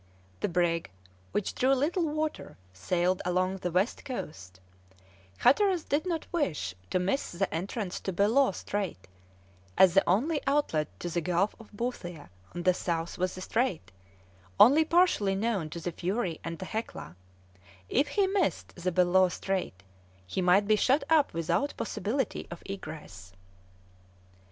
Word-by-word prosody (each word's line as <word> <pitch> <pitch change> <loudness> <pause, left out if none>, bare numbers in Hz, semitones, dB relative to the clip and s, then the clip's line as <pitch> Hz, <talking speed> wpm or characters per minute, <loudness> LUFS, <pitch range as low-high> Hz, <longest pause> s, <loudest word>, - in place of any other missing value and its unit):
The - - -1
brig, 170 -1 0 0.4
which 205 - -1
drew 265 +2 +3
little 325 +6 +1
water, 310 +1 -3 0.2
sailed 175 - 0
along 185 +1 0
the 180 -1 -3
west 185 +7 0
coast; 95 - -7 0.8
Hatteras 370 - +3
did 300 +6 -1
not 330 -3 -2
wish 175 - -1 0.2
to - - +1
miss 190 +10 -1
the 190 +2 -1
entrance 185 +3 -3
to 190 - -3
Bellot 210 +6 +3
Strait, 195 - -4 0.7
as 185 -2 +7
the 195 - +5
only 285 - +2
outlet 270 - +1
to 175 - -3
the 175 - 0
Gulf 180 +5 0
of 225 - -14
Boothia 185 - -5 0.2
on 175 - -4
the 185 - +4
south 170 -1 -3
was 185 0 0
the 185 - -7
strait, 205 - -1 0.7
only 285 +7 +8
partially 320 - +3
known 195 -6 -1
to 170 - -6
the 175 +1 -3
Fury 180 0 -2
and 165 0 -5
the 185 - -6
Hecla; 215 - -5 0.7
if 280 +4 +2
he 400 +4 +2
missed 380 -3 -1
the 180 +1 -2
Bellot 180 +1 +4
Strait, 185 - -3 0.4
he 90 - -2
might 185 +3 +4
be 215 - +5
shut 265 +7 +3
up 310 -3 +4
without 165 - -1
possibility 225 +4 -2
of 170 - -9
egress. 150 - -8
190 Hz, 150 wpm, -29 LUFS, 175-260 Hz, 0.8 s, only